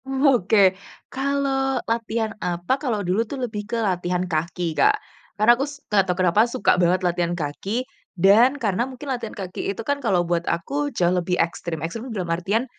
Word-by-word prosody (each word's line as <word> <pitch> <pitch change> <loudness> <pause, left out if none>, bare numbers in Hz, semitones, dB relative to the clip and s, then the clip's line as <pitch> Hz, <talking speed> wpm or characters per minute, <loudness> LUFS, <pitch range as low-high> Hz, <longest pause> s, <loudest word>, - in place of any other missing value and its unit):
Oke, 265 -6 +2 0.6
kalau 270 0 0
latihan 230 -1 -1
apa, 175 +5 -1
kalau 220 -8 -1
dulu 185 +5 +1
tuh 280 - -5
lebih 210 -3 -6
ke 235 - -1
latihan 180 -1 -1
kaki, 170 0 -2
Kak, - - +3 0.4
karena 215 +3 +6
aku 265 +3 -1
s 285 - -10
nggak 205 -2 +3
tahu 180 - 0
kenapa 180 +5 +4
suka 220 - +2
banget 180 +1 +2
latihan 175 0 0
kaki 190 - -3 0.3
dan 220 +9 +5
karena 235 0 -1
mungkin 260 +2 -10
latihan 235 -3 -6
kaki 185 -1 -4
itu 195 - -3
kan 285 0 -1
kalau 185 -8 +1
buat 170 0 0
aku 280 +13 -1
jauh 175 0 +3
lebih 180 0 0
ekstrim. 165 -1 -2
Ekstrim 225 +9 -6
tuh 225 - -5
dalam 175 -3 -1
artian, 200 +8 0
205 Hz, 185 wpm, -23 LUFS, 175-245 Hz, 0.6 s, karena